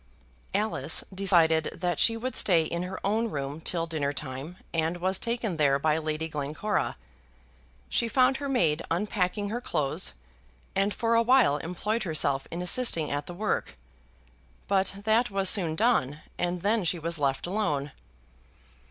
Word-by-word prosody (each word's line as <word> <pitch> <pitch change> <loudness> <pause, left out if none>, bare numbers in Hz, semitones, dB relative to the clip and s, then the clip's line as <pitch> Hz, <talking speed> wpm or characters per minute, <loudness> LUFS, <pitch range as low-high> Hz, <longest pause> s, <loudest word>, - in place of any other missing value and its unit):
Alice 215 +2 +1
decided 170 -5 +3
that 175 -3 -2
she 225 -1 +3
would 255 +3 -4
stay 170 -5 +4
in 170 +2 -3
her 185 +1 -5
own 220 +3 +1
room 145 -1 -4
till 165 0 -2
dinner 155 -4 -2
time, 140 +4 -6 0.2
and 165 +1 0
was 185 +2 0
taken 230 -6 -2
there 140 -3 +3
by 155 +2 +1
Lady 155 0 -2
Glencora. 155 +7 -2 0.9
She 235 - 0
found 255 +2 +3
her 280 -1 -4
maid 165 - +2
unpacking 195 +2 -1
her 235 +3 -3
clothes, 135 - -1 0.6
and 195 +1 +2
for 230 +2 0
a 230 - +5
while 230 - +4
employed 180 +8 -3
herself 155 -7 +1
in 175 +1 -4
assisting 180 -6 +2
at 145 0 -3
the 175 - -7
work; 210 +3 -2 0.9
but 195 -1 +1
that 225 +3 +3
was 195 -2 +3
soon 170 -6 +3
done, 155 - +1
and 175 0 -2
then 215 +1 +2
she 175 +1 +1
was 165 0 -3
left 135 -2 0
alone. 150 -8 -1
175 Hz, 155 wpm, -27 LUFS, 155-215 Hz, 0.9 s, a